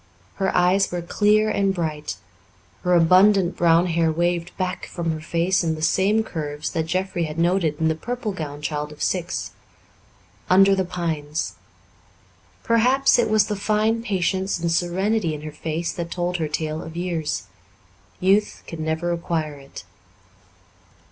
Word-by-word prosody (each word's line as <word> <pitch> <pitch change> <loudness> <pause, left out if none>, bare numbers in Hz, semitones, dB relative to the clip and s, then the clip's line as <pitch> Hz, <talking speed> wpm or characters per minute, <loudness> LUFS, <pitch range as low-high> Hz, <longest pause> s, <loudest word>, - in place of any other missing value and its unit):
Her 195 - +1
eyes 180 +2 +3
were 175 -1 -3
clear 210 +4 +3
and 195 -1 +1
bright; 155 - -3 0.7
her 180 0 +2
abundant 185 +2 +5
brown 170 0 +4
hair 165 -2 +1
waved 175 +1 -1
back 185 0 -3
from 170 -2 -3
her 155 -1 -4
face 170 +4 +1
in 160 -1 0
the 155 - -6
same 205 +6 +2
curves 150 -5 -4
that 160 -1 -2
Jeffrey 185 -1 -1
had 155 0 -6
noted 170 -3 +1
in 160 - +2
the 160 - +2
purple 240 +6 -4
gowned 150 -5 -6
child 150 0 -3
of 150 - -6
six, 175 - -2 1.0
under 195 +2 +6
the 190 -1 +1
pines. 160 -4 -3 1.1
Perhaps 250 +4 +3
it 240 - +2
was 215 -1 +4
the 210 - -2
fine 215 +3 +1
patience 190 -3 -1
and 170 0 -1
serenity 175 +1 0
in 150 - -9
her 155 - -6
face 160 +2 -3
that 170 -1 -5
told 175 +1 -2
her 160 -2 -1
tale 155 +1 -3
of 160 +1 -9
years. 170 -6 -2 0.8
Youth 195 +3 +2
can 160 -1 -6
never 160 +2 -1
acquire 165 -3 -2
it. 135 -6 -11
175 Hz, 155 wpm, -23 LUFS, 160-195 Hz, 1.1 s, under